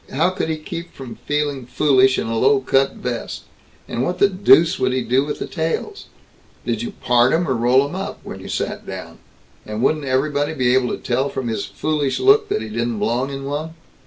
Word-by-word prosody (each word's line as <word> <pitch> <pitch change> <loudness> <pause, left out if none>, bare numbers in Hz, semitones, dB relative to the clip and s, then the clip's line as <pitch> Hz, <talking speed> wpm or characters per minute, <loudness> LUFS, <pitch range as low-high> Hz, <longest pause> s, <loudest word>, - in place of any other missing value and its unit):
How 160 +7 +1
could 185 - -3
he 160 - -1
keep 170 +2 -7
from 130 -3 -9
feeling 145 -4 -1
foolish 130 -2 +3
in - - -1
a 115 0 -2
low 135 +4 +4
cut 135 +1 +2
vest, 120 -2 -5 0.4
and 120 - -3
what 175 +7 -1
the 200 - +5
deuce 185 -4 +4
would 130 0 +1
he 130 -1 0
do 130 +3 +2
with 145 0 -4
the - - -4
tails? 165 - -3 0.6
Did - - -1
you 230 -3 -5
part 125 +1 +4
'em 170 +1 +1
or 130 - +1
roll 125 +4 +3
'em 145 - -9
up, 190 +1 -5
when - - -8
you - - -9
sat - - -3
down? - - -8 0.4
And 110 +2 -4
wouldn't 150 +1 +1
everybody 145 +3 0
be 125 -3 +2
able 130 -1 +2
to - - -2
tell 130 +3 -1
from 130 -4 -3
his 110 -2 -3
foolish 150 -3 -1
look 415 +2 +4
that - - -1
he 110 - -7
didn't 115 +1 -2
belong 120 +6 0
in 135 0 -6
one?" 150 +4 -4
135 Hz, 220 wpm, -20 LUFS, 125-155 Hz, 0.6 s, the